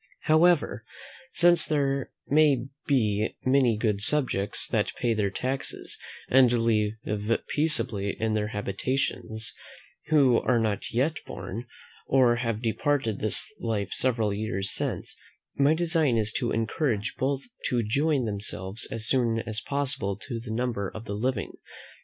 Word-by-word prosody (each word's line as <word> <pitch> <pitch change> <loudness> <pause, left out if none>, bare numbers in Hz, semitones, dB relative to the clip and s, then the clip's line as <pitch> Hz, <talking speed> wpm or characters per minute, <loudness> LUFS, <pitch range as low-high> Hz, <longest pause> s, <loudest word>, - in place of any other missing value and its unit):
However, 160 +1 +3 0.5
since 175 -2 +4
there 140 -3 0 0.2
may 145 -4 +4 0.2
be 110 -6 +1
many 130 -4 +4
good 105 -3 0
subjects, 120 -6 +1
that - - 0
pay 120 -2 +1
their 105 -2 0
taxes, 130 +6 -4 0.3
and 130 -2 +5
live 110 -3 +2 0.6
peaceably 115 -10 +1
in 110 -1 0
their 105 -1 0
habitations, 110 +1 -3 0.5
who 135 -6 +5
are 125 - +2
not 110 -3 -1
yet 140 +7 +1
born, 115 +5 -6 0.4
or 125 -3 +4
have 115 -2 -2
departed 115 -1 0
this 110 - +1
life 105 -4 -2
several 115 -5 +1
years 100 -2 -1
since, - - -3 0.4
my 140 +3 +4
design 160 -7 +2
is 110 -1 0
to 120 - -1
encourage 115 -1 -1
both 135 +1 0 0.2
to 120 -2 +1
join 140 +4 +1
themselves 100 0 -5
as 115 -1 -4
soon 115 -3 +2
as 110 -1 -3
possible 135 -8 -2
to 115 +2 -6
the 115 - -9
number 110 -4 -1
of 110 +1 -9
the 100 - -4
living. 115 0 -1
115 Hz, 135 wpm, -27 LUFS, 105-135 Hz, 0.6 s, and